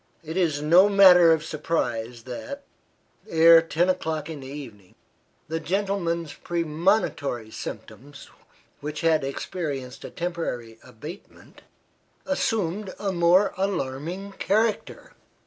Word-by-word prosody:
It 160 +1 -7
is 160 -6 0
no 175 +6 +6
matter 180 -4 +7
of 160 -1 +2
surprise 120 -8 -3
that, 280 - -7 0.7
ere 165 0 +7
ten 165 +2 0
o'clock 160 -4 -2
in 155 - -7
the 130 - -9
evening, 120 -9 -10 0.5
the 160 +1 -3
gentleman's 170 -4 -2
premonitory 160 - -1
symptoms, 140 +5 -9 0.5
which 150 +1 -5
had 160 -3 +2
experienced 135 -2 -5
a - - -7
temporary 125 -10 -5
abatement, 145 - -12 0.6
assumed 210 -8 -1
a 200 -2 -2
more 180 +3 +3
alarming 185 +1 -3
character. 215 +2 -1
165 Hz, 110 wpm, -25 LUFS, 140-185 Hz, 0.7 s, matter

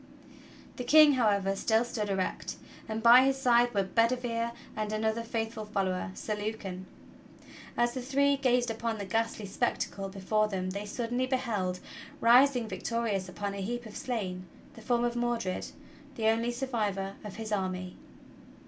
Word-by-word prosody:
The 250 - -3
King, 305 +3 +7
however, 200 -6 +2
still 220 +3 +2
stood 215 -3 -3
erect, 190 -1 -2 0.3
and 220 +1 -3
by 240 +2 +9
his 270 0 +2
side 245 -2 +4
were 200 -3 +1
Bedi 230 +6 +2
vere 235 -1 -2 0.2
and 215 -1 -2
another 220 +1 0
faithful 225 -1 -3
follower. 195 -2 -1
Sir 215 - -3
Lucan. 205 -3 -5 0.9
As 240 0 +2
the 255 - -4
three 280 +2 +2
gazed 250 -3 +2
upon 225 0 -2
the 200 - -5
ghastly 225 +1 -1
spectacle 195 0 -2
before 210 +2 0
them 185 -2 -3
they 200 +2 -5
suddenly 245 +3 -2
beheld, 215 -9 -1 0.4
rising 245 0 +5
victorious 220 -5 -2
upon 200 +2 -4
a 200 - -5
heap 240 +4 -3
of 215 - -10
slain, 200 -9 -4 0.3
the 225 - -12
form 240 +1 +1
of 240 0 0
Mordred, 240 -5 -1 0.5
the 220 -1 +2
only 230 +2 +1
sur 245 +3 -3
vivor 200 -6 -2
of 210 -2 -7
his 220 -1 -6
army. 185 -2 -2
225 Hz, 160 wpm, -30 LUFS, 200-240 Hz, 0.9 s, by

